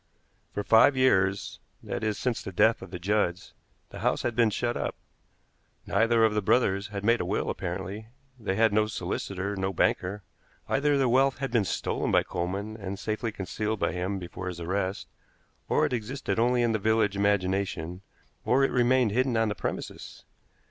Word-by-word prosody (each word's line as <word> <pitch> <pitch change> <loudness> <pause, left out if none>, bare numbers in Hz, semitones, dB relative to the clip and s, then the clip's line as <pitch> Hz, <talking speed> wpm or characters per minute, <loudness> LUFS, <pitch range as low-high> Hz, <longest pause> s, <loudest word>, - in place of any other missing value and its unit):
For 105 - -3
five 115 +6 +5
years 100 -7 +2 0.2
that - - -4
is, 110 -1 0
since 125 -3 -1
the - - -6
death 110 +5 +3
of - - -9
the 90 - -6
Judds 95 -1 -1 0.4
the - - -8
house - - 0
had 120 - -1
been 115 -1 +4
shut 120 +3 -1
up. - - -2 0.9
Neither 115 +2 +3
of 110 - +2
the 105 - +1
brothers 100 -2 +2
had 100 -2 -6
made 115 +1 +3
a - - -1
will - - -1
apparently; 105 +5 -5 0.3
they 100 -4 -2
had 110 0 +3
no 110 0 +3
solicitor, 100 0 -3
no 95 0 -1
banker. 95 +2 0 0.4
Either 145 +1 +2
their 135 -2 +2
wealth 135 +2 +3
had 135 -2 -3
been 115 -4 +2
stolen - - -2
by - - +4
Coleman, 100 +5 -4
and 100 -2 -5
safely 110 +3 -3
concealed 105 +2 -3
by - - +1
him 90 +2 -2
before 90 0 -7
his 90 -2 -5
arrest, 95 +3 -2 0.6
or - - +3
it - - -2
existed 120 +2 -2
only 120 +1 +3
in 120 - +2
the 110 - 0
village 110 -1 +2
imagination, 95 -3 0 0.4
or 135 +2 +3
it 135 - +2
remained 125 -2 +3
hidden 125 +1 +1
on 115 -1 +2
the - - -1
premises. - - -6
105 Hz, 185 wpm, -27 LUFS, 95-115 Hz, 0.9 s, five